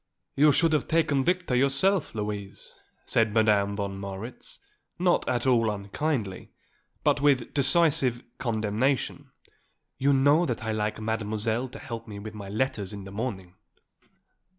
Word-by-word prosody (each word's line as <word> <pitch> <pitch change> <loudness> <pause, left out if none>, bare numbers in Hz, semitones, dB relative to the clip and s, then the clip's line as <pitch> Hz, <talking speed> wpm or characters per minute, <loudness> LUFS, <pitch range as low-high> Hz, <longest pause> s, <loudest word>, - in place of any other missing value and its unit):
"You 150 +2 +6
should 165 +3 +3
have 150 - +1
taken 155 -4 +2
Victor 180 -4 0
yourself, 140 - +2
Louise," 105 -2 -5 0.3
said 110 -2 +1
Madame 105 -2 +3
von 100 -1 -4
Marwitz, 100 +5 -7 0.4
not 175 0 +2
at 120 0 0
all 120 -4 +3
unkindly, 105 +1 -3 0.5
but 145 - +2
with 140 -4 +2
decisive 140 -4 +3 0.2
condemnation. 115 +3 -1 0.7
"You 140 +2 +3
know 145 +5 +4
that 120 -3 -3
I 110 - -2
like 105 0 -2
Mademoiselle 110 +2 -2
to 135 - -10
help 115 -4 -7
me 105 -2 -8
with 105 +2 -8
my 100 -2 -8
letters 105 -2 -2
in 100 -1 -7
the 95 - -10
morning." 100 -5 -5
115 Hz, 140 wpm, -27 LUFS, 105-140 Hz, 0.7 s, You